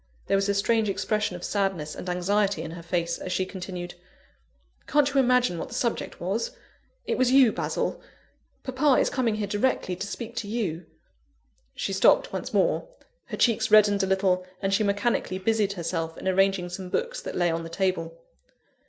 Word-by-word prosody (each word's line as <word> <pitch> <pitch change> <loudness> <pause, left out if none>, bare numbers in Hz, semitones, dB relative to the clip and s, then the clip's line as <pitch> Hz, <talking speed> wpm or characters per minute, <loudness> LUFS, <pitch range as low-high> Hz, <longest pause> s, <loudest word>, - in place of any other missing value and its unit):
There - - +1
was 195 +1 +1
a 200 - +2
strange 220 +1 +2
expression 205 0 -1
of 175 - -8
sadness 195 -7 -1
and 180 - -6
anxiety 195 0 +1
in 160 - -6
her 170 0 -8
face, 170 0 -2
as 185 - -5
she 185 - 0
continued: 180 -2 -6 0.9
"Can't 295 -1 +3
you 275 - +4
imagine 250 -8 +3
what - - -4
the 245 - -8
subject 235 -2 -2
was? 210 - -2 0.5
It - - -1
was 255 -1 +3
you, 260 -4 +6
Basil. - - -2 0.6
Papa 260 +1 +3
is - - +1
coming 240 -5 +1
here 215 -1 -2
directly, 205 -2 0
to 200 +3 -5
speak 235 +3 -6
to 230 -3 -3
you." 200 -7 -3 0.9
She - - -2
stopped - - +4
once - - -4
more. - - +1 0.4
Her - - -6
cheeks 225 -2 +2
reddened 205 -2 +6
a 190 - 0
little, 190 -1 +2 0.2
and 195 0 -1
she 200 - +3
mechanically 200 -1 0
busied 205 0 +1
herself 165 -2 -3
in - - -6
arranging 190 -1 +2
some 185 +1 -6
books - - -2
that - - -6
lay 175 -1 +2
on 165 0 -2
the 165 - -7
table. 165 -2 -1
195 Hz, 185 wpm, -26 LUFS, 180-225 Hz, 0.9 s, you